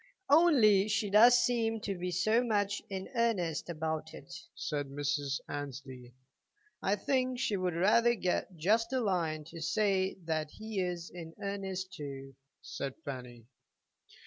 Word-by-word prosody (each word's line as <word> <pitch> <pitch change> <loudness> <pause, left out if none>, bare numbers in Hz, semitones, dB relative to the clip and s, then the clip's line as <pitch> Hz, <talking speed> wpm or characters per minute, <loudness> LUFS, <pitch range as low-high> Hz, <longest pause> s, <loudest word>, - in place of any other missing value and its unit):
"Only 245 - +6
she 205 -1 0
does 235 +4 +8
seem 225 -3 +1
to 200 -1 -3
be 180 0 -3
so 215 +7 +2
much 205 -3 0
in 190 -1 -4
earnest 200 -10 0
about 160 -1 -3
it," 175 - -11 0.2
said 145 -2 -3
Mrs. 145 0 -2
Annesley. 130 -3 -7 0.7
"I 195 - +2
think 255 +4 0
she 235 -4 0
would 180 -3 -1
rather 230 +7 +4
get 180 -2 -2
just 220 +8 +2
a 260 - +2
line 170 -8 0
to 165 +2 -10
say 190 +3 +1
that 155 -2 -1
he 215 +3 -5
is 175 -1 -4
in 165 -2 -9
earnest 190 -2 -4
too," 135 -5 -7 0.3
said 135 -1 -5
Fanny. 125 -4 -7
185 Hz, 145 wpm, -32 LUFS, 155-215 Hz, 0.7 s, does